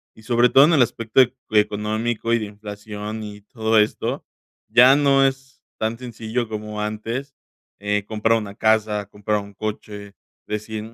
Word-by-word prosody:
y 110 - -17
sobre 120 +1 +3
todo, 135 +2 +7
en 165 - +3
el 140 - +5
aspecto, 115 +1 +2
ec 125 +1 +1 0.2
económico 110 +2 0
y 115 - +3
de 110 - -3
inflación 105 +1 -7
y 105 -1 -9
todo 110 +1 +1
esto. 105 - -1 0.4
Ya 130 +3 +7
no 140 -1 +4
es 135 0 -4 0.2
tan 110 +1 -2
sencillo 120 -1 -4
como 105 0 -5
antes, 115 +6 -4 0.5
eh, 105 0 -1
comprar 110 +1 +1
una 100 -2 -6
casa, 110 -2 +1
comprar 105 +1 -2
un 100 0 -12
coche, 105 -1 -6 0.3
decir: 105 0 -4
"Mm, 115 +1 -11
110 Hz, 165 wpm, -22 LUFS, 105-120 Hz, 0.5 s, todo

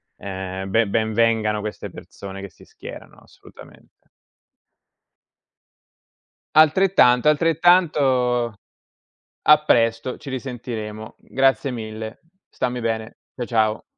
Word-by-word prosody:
ehm, 95 0 -6
be 115 +1 +2
ben 110 +1 0
vengano 110 -1 +1
queste 105 0 -6
persone 100 -1 -10
che 100 0 -8
si - - -20
schierano - - -12
assolutamente. - - -18 2.5
Altrettanto, 155 -5 +5
altrettanto. 145 -7 +2 0.9
A 150 0 +7
presto, 115 -2 +1
ci 140 - -10
risentiremo. 115 -4 -6
Grazie 135 +1 +1
mille. 110 -1 -7 0.3
Stammi 125 0 -3
bene. 110 -1 -3 0.2
Ciao, 120 - -4
ciao. 110 -2 0
115 Hz, 95 wpm, -22 LUFS, 110-135 Hz, 2.5 s, A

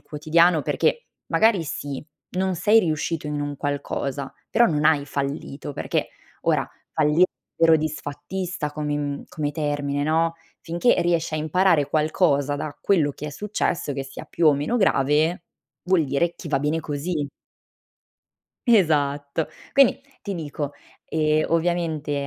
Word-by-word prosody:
quotidiano, 160 +1 +2
perché 475 - 0 0.2
magari 215 -7 +3
sì, 145 -2 -5 0.3
non 185 0 0
sei 210 +6 +4
riuscito 160 -3 -1
in 150 0 -2
un 145 0 -3
qualcosa, 140 -1 -3 0.2
però 240 - +4
non 150 -6 +2
hai 145 -3 +3
fallito, 140 0 -4
perché - - -1 0.3
ora - - +1 0.3
falli 155 +3 +4 0.3
vero 165 -1 +6
disfattista 155 +2 -4
come 150 -1 -2
mhmm, 145 -1 -3
come 150 -2 -2
termine, 145 -2 -1
no. 165 +2 +2 0.3
Finché 170 +8 +2
riesci 170 -2 0
a - - 0
imparare 155 -1 +2
qualcosa 150 -2 +2
da 145 0 -5
quello 160 -7 +2
che 150 - -7
è - - -4
successo, 195 -5 -2
che 135 0 -3
sia 135 0 -9
più 170 - 0
o 150 - +7
meno 150 +13 -1
grave, 155 - +2 0.4
vuol 180 -3 +3
dire 145 +5 0
che 165 - -8
va 135 -2 +1
bene 150 +3 0
così. 150 0 -3 1.4
Esatto. 150 -7 +2 0.2
Quindi, 275 -1 +5 0.2
ti 200 -2 -4
dico, 145 -3 -4 0.3
ehm, 155 -1 +1
ovviamente, 160 -4 0
155 Hz, 140 wpm, -24 LUFS, 145-170 Hz, 1.4 s, o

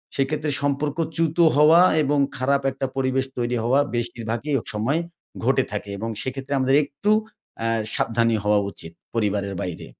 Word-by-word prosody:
সেই 135 - +2
ক্ষেত্রে 155 0 -2
সম্পর্ক 145 +2 -1 0.2
চ্যুত 165 0 0 0.2
হওয়া 155 +4 +7 0.2
এবং 145 +1 +1 0.2
খারাপ 140 +2 +1
একটা 135 +1 -3
পরিবেশ 130 0 0
তৈরি 120 0 -1
হওয়া 125 +4 +3 0.2
বেশিরভাগই 120 +3 -3
ও - - -8
সময় 130 +10 0 0.5
ঘটে 130 0 +3
থাকে 105 -1 -4
এবং 115 +3 -4
সেক্ষেত্রে 135 +1 -4
আমাদের 130 +1 +3
একটু 145 +9 -4 0.5
অ্যা 115 - -1 0.3
সাবধানী 115 0 +1
হওয়া 105 0 +3
উচিত 80 - -8 0.2
পরিবারের 100 -3 0
বাইরে। 90 -2 -5
130 Hz, 155 wpm, -23 LUFS, 115-145 Hz, 0.5 s, হওয়া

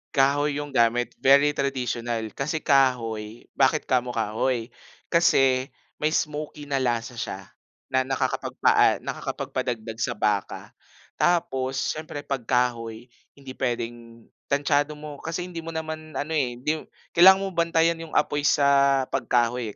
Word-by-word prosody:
Kahoy 140 +2 +2
'yung 145 -1 -6
gamit 120 -1 +2
very 140 +2 +5
traditional, 120 -5 -2
kasi 150 +3 -3
kahoy, 115 -5 +1 0.2
bakit 135 +3 +3
kamo 125 -1 0
kahoy? 115 +2 -1 0.4
Kasi, 135 -6 +3 0.3
may 155 +1 0
smokey 150 -1 -3
na 140 - +1
lasa 120 -1 -1
siya 95 - -4 0.5
na 130 0 +2
nakakapagpaa 135 0 +2
nakakapag-padagdag 115 -2 -4
sa 120 - 0
baka. 105 -2 -2 0.5
Tapos, 135 -7 +1 0.2
siyempre 155 -1 -6
pag 135 -4 -4
kahoy, 120 -2 -1 0.3
hindi 135 -2 -10
puwedeng 115 -2 -4 0.2
tantsado 145 +1 +1
mo, 150 -1 -9
kasi 165 +2 -4
hindi 175 -2 -7
mo 165 0 -7
naman 155 -1 -6
ano 155 +3 -3
eh, 130 -6 0
hindi 150 +6 -2
mo - - -11 0.3
kailangan 190 +3 +7
mo 195 - -3
bantayan 165 -1 +2
'yung 165 -1 -8
apoy 145 0 +1
sa 140 -1 +4
pag - - -2
kahoy 120 -2 0
135 Hz, 135 wpm, -25 LUFS, 120-150 Hz, 0.5 s, kailangan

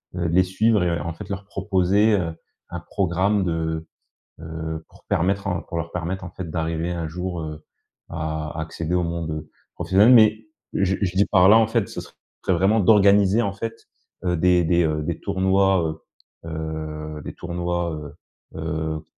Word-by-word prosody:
heu, 90 -2 -1
les 90 +3 +4
suivre 105 +2 +2
et 85 -2 0
en 85 - -3
fait, 95 +4 -9
leur 100 0 -5
proposer, 100 +1 +2
heu, 80 -2 -3 0.4
un - - -5
programme 95 +2 0
de, 80 -1 -2 0.5
heu 80 0 -5
pour - - -21
permettre 100 +4 0
un 90 -3 -1
pour 85 - -6
leur 85 0 -4
permettre 90 +2 -3
en 90 - -8
fait, 90 -2 -7
d'arriver 80 0 -2
un 85 -2 -3
jour, 90 +2 -4
heu, 75 0 -7 0.5
à 80 -1 -3
à - - -1
accéder 80 +2 -3
au 90 - +2
monde, 85 -1 -3
heu, 75 0 -5 0.3
professionnel. 105 +6 +5
Mais, 110 -2 +5 0.3
je 95 0 +1
je 95 -2 -1
dis 100 - +5
par 95 -2 +5
là, 110 - +8
en 110 - +3
fait, 115 -2 0
ce - - -6
serait - - -14 0.4
vraiment 95 +6 +3
d'organiser 100 +1 +5
en 100 -3 -1
fait, 115 +3 -6 0.4
heu, 90 -1 +1
des 90 +1 +4
des, 85 +1 +3
heu, 75 -1 0
des 85 +1 -3
tournois, 95 0 +2 0.7
heu, - - -6
heu, 80 -1 -5
des - - -7
tournois, 85 0 -2
heu, 75 -1 -7 0.5
heu, 80 -1 -3
90 Hz, 180 wpm, -23 LUFS, 80-100 Hz, 0.7 s, là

